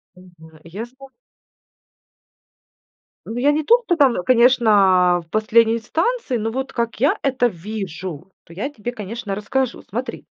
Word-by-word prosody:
Мгм. 165 Hz, -3 st, -17 dB
Я 190 Hz, +7 st, -7 dB
зна 260 Hz, +3 st, -15 dB, 2.2 s
Ну, 225 Hz, -, -6 dB
я 280 Hz, +4 st, +3 dB
не 310 Hz, +1 st, -1 dB
тот, 475 Hz, +9 st, +4 dB
кто 350 Hz, -, +1 dB
там, 270 Hz, -, +3 dB
конечно, 205 Hz, -8 st, +4 dB
в -, -, -35 dB
последней 225 Hz, +1 st, +3 dB
инстанции, 325 Hz, -, -2 dB
но 225 Hz, 0 st, -2 dB
вот 265 Hz, +3 st, -4 dB
как 235 Hz, -2 st, -3 dB
я 280 Hz, +5 st, +2 dB
это 260 Hz, -3 st, +1 dB
вижу, 185 Hz, -4 st, -7 dB
то -, -, -19 dB
я 210 Hz, +11 st, -4 dB
тебе, 240 Hz, -4 st, -6 dB
конечно, 215 Hz, -2 st, -6 dB
расскажу. 235 Hz, +5 st, -2 dB
Смотри. 245 Hz, +6 st, -5 dB
225 Hz, 145 wpm, -20 LUFS, 190-260 Hz, 2.2 s, тот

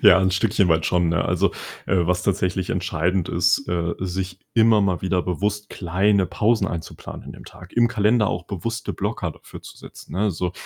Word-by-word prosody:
Ja, 90 Hz, -, +8 dB
'n 95 Hz, -, +2 dB
Stückchen 100 Hz, 0 st, +2 dB
weit 80 Hz, -1 st, +2 dB
schon, 90 Hz, -2 st, +2 dB
ne? 85 Hz, +1 st, +1 dB
Also, -, -, +1 dB, 0.3 s
äh, 95 Hz, -, +2 dB
was 90 Hz, 0 st, +1 dB
tatsächlich 95 Hz, -1 st, 0 dB
entscheidend 90 Hz, 0 st, 0 dB
ist, 90 Hz, +9 st, +2 dB
äh, 85 Hz, -1 st, -1 dB
sich 95 Hz, 0 st, -4 dB, 0.2 s
immer 110 Hz, -2 st, +5 dB
mal 95 Hz, -4 st, 0 dB
wieder 95 Hz, -1 st, +1 dB
bewusst 105 Hz, +4 st, -2 dB
kleine 95 Hz, +2 st, +1 dB
Pausen 105 Hz, +3 st, +1 dB
einzuplanen 85 Hz, -3 st, -7 dB
in -, -, -8 dB
dem -, -, -12 dB
Tag. -, -, -13 dB
Im 120 Hz, 0 st, +3 dB
Kalender 110 Hz, -1 st, +2 dB
auch 90 Hz, 0 st, -3 dB
bewusste 115 Hz, +5 st, -4 dB
Blocker 100 Hz, -3 st, -3 dB
dafür -, -, -13 dB
zu -, -, -12 dB
setzen, -, -, -12 dB
ne, 105 Hz, +3 st, +1 dB
so? 90 Hz, 0 st, -3 dB
95 Hz, 190 wpm, -23 LUFS, 90-105 Hz, 0.3 s, Ja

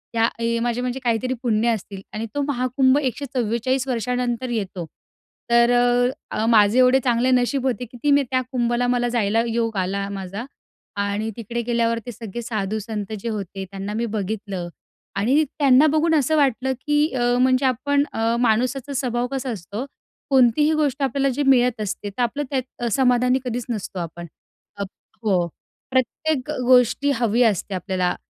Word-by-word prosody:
या 225 Hz, 0 st, +4 dB, 0.3 s
माझे 240 Hz, 0 st, -1 dB
म्हणजे 250 Hz, +1 st, -2 dB
काहीतरी 245 Hz, +2 st, 0 dB
पुण्य 230 Hz, 0 st, +2 dB
असतील. 200 Hz, -3 st, -3 dB
आणि 215 Hz, +1 st, -3 dB
तो 290 Hz, -, 0 dB
महाकुंभ 260 Hz, 0 st, +2 dB
144 255 Hz, -1 st, -1 dB
वर्षानंतर 245 Hz, +1 st, -1 dB
येतो. 195 Hz, -6 st, -3 dB, 0.7 s
तर 235 Hz, 0 st, +5 dB, 0.6 s
अ, 220 Hz, -, 0 dB
माझे 220 Hz, -1 st, +5 dB
एवढे 255 Hz, +1 st, +6 dB
चांगले 245 Hz, +1 st, +2 dB
नशीब 255 Hz, +2 st, +1 dB
होते 250 Hz, 0 st, -2 dB
की 245 Hz, +2 st, -13 dB
ती 290 Hz, -, +3 dB
मी 285 Hz, 0 st, +5 dB
त्या 255 Hz, -, +2 dB
कुंभला 240 Hz, -1 st, +1 dB
मला 245 Hz, 0 st, +1 dB
जायला 225 Hz, -1 st, +1 dB
योग 230 Hz, -2 st, -1 dB
आला 195 Hz, +1 st, -1 dB
माझा. 195 Hz, +3 st, -5 dB, 0.6 s
आणि 205 Hz, +2 st, -1 dB
तिकडे 235 Hz, +1 st, -4 dB
गेल्यावर 230 Hz, -1 st, 0 dB
ते 245 Hz, -, -5 dB
सगळे 225 Hz, 0 st, -7 dB
साधू-संत 215 Hz, -1 st, -3 dB
जे 230 Hz, +3 st, -4 dB
होते 195 Hz, -2 st, -5 dB
त्यांना 195 Hz, +1 st, -5 dB
मी 230 Hz, +2 st, -1 dB
बघितलं 200 Hz, -3 st, -3 dB, 0.5 s
आणि 255 Hz, +10 st, +3 dB, 0.2 s
त्यांना 280 Hz, +1 st, +6 dB
बघून 315 Hz, +2 st, +2 dB
असं 310 Hz, +1 st, +2 dB
वाटलं 265 Hz, -2 st, +2 dB
की 295 Hz, +1 st, +3 dB
अ, 245 Hz, -2 st, 0 dB, 0.2 s
म्हणजे 255 Hz, +1 st, +3 dB
आपण 280 Hz, +3 st, +2 dB
अ, 225 Hz, +1 st, +1 dB
माणुसाचा 250 Hz, +4 st, +1 dB
स्वभाव 245 Hz, -2 st, -1 dB
कसा 265 Hz, -1 st, -3 dB
असतो 210 Hz, +4 st, -5 dB, 0.5 s
कोणतीही 265 Hz, +4 st, +4 dB
गोष्ट 295 Hz, -3 st, 0 dB
आपल्याला 275 Hz, 0 st, +1 dB
जे 290 Hz, -, 0 dB
मिळत 250 Hz, -3 st, +3 dB
असते. 205 Hz, 0 st, -4 dB
तर 200 Hz, +5 st, -5 dB
आपलं 280 Hz, +5 st, -1 dB
त्यात 260 Hz, -3 st, -4 dB
समाधानी 250 Hz, -1 st, +3 dB
कधीचं 245 Hz, 0 st, -3 dB
नसतो 195 Hz, -3 st, -5 dB
आपण. 170 Hz, 0 st, -6 dB, 0.5 s
अ, 200 Hz, -, -2 dB, 0.4 s
हो. 185 Hz, -5 st, +2 dB, 0.4 s
प्रत्येक 260 Hz, +2 st, 0 dB
गोष्टी 255 Hz, +3 st, +4 dB
हवी 235 Hz, 0 st, +1 dB
असते 205 Hz, -3 st, 0 dB
आपल्याला. 185 Hz, 0 st, -1 dB
240 Hz, 155 wpm, -22 LUFS, 215-260 Hz, 0.7 s, एवढे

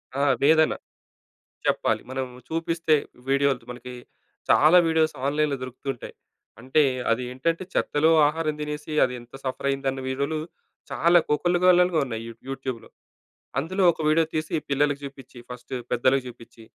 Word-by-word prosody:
ఆ! 140 Hz, -, 0 dB, 0.2 s
వేదన. 155 Hz, +1 st, +5 dB, 0.9 s
చెప్పాలి -, -, +1 dB
మనం 130 Hz, 0 st, -2 dB, 0.2 s
చూపిస్తే 165 Hz, 0 st, +1 dB, 0.3 s
వీడియోలు 140 Hz, -3 st, +1 dB
మనకి 125 Hz, 0 st, -9 dB, 0.6 s
చాలా 155 Hz, +4 st, +6 dB
వీడియోస్ 160 Hz, -1 st, +2 dB
ఆన్‍లైన్‌లో 145 Hz, 0 st, +1 dB
దొరుకుతూ 130 Hz, +2 st, -9 dB
ఉంటాయి. -, -, -10 dB, 0.5 s
అంటే 130 Hz, +5 st, +2 dB, 0.3 s
అదేంటంటే 125 Hz, +9 st, -1 dB
చెత్తలో 155 Hz, +2 st, +2 dB, 0.2 s
ఆహారం 155 Hz, 0 st, 0 dB
తినేసి 150 Hz, 0 st, -5 dB
అదెంత 125 Hz, -1 st, -4 dB
సఫరయ్యిందన్న 135 Hz, 0 st, -2 dB
వీడియోలు 140 Hz, +4 st, -1 dB, 0.5 s
చాలా 170 Hz, +1 st, +4 dB
కోకోల్లలుగా 180 Hz, +1 st, +3 dB
ఉన్నాయి 115 Hz, -2 st, -5 dB, 0.3 s
యూట్యూబ్‍లో. 130 Hz, -4 st, -5 dB, 0.7 s
అందులో 185 Hz, +7 st, -1 dB
ఒక -, -, -12 dB
వీడియో 160 Hz, +1 st, +4 dB
తీసి 155 Hz, 0 st, -2 dB, 0.2 s
పిల్లలకి 145 Hz, 0 st, +1 dB
చూపించి, 135 Hz, -2 st, -11 dB
ఫస్టు 125 Hz, +1 st, -8 dB, 0.2 s
పెద్దలకి 130 Hz, +2 st, +2 dB
చూపించి, 115 Hz, -2 st, -12 dB
140 Hz, 120 wpm, -25 LUFS, 130-160 Hz, 0.9 s, చాలా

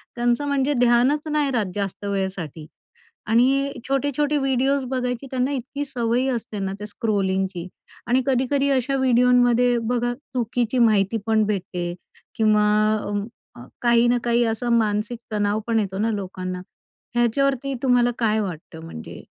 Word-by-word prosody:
त्यांचं 240 Hz, +3 st, +1 dB
म्हणजे 280 Hz, 0 st, +1 dB
ध्यानच 250 Hz, +5 st, +3 dB
नाही 295 Hz, -2 st, +1 dB
राहत 230 Hz, -5 st, +1 dB
जास्त 200 Hz, 0 st, -4 dB
वेळेसाठी 190 Hz, -6 st, -3 dB, 0.6 s
आणि 270 Hz, +4 st, +3 dB, 0.2 s
छोटे-छोटे 285 Hz, +2 st, 0 dB
व्हिडिओज 270 Hz, 0 st, +1 dB
बघायची 250 Hz, 0 st, -2 dB
त्यांना 255 Hz, +1 st, 0 dB
इतकी 280 Hz, +2 st, -4 dB
सवय 245 Hz, -1 st, 0 dB
असते 230 Hz, -3 st, -4 dB
ना 195 Hz, 0 st, -2 dB
त्या 210 Hz, -, -6 dB
स्क्रोलिंगची 190 Hz, -4 st, -1 dB, 0.4 s
आणि 255 Hz, +2 st, +3 dB
कधी-कधी 275 Hz, +2 st, +1 dB
अशा 270 Hz, +1 st, +1 dB
व्हिडिओंमध्ये 245 Hz, -1 st, +4 dB
बघा 245 Hz, 0 st, 0 dB
चुकीची 245 Hz, -2 st, -2 dB
माहिती 215 Hz, -1 st, +3 dB
पण 220 Hz, -1 st, +3 dB
भेटते 180 Hz, -4 st, -3 dB, 0.4 s
किंवा 215 Hz, -1 st, +3 dB, 0.9 s
अ, -, -, -12 dB
अ, 120 Hz, -, -10 dB, 0.2 s
काही 240 Hz, 0 st, +4 dB
ना 245 Hz, 0 st, +3 dB
काही 240 Hz, 0 st, +2 dB
असं 240 Hz, +2 st, -3 dB
मानसिक 215 Hz, +2 st, -1 dB
तणाव 205 Hz, 0 st, 0 dB
पण 225 Hz, -1 st, +2 dB
येतो 195 Hz, -2 st, -3 dB
ना 225 Hz, +1 st, +1 dB
लोकांना. 185 Hz, -2 st, -4 dB, 0.5 s
ह्याच्यावरती 270 Hz, +3 st, +1 dB
तुम्हाला 245 Hz, -1 st, +3 dB
काय 220 Hz, -1 st, +2 dB
वाटतं 165 Hz, -4 st, -6 dB
म्हणजे? 80 Hz, -, -9 dB
240 Hz, 140 wpm, -23 LUFS, 210-260 Hz, 0.9 s, व्हिडिओंमध्ये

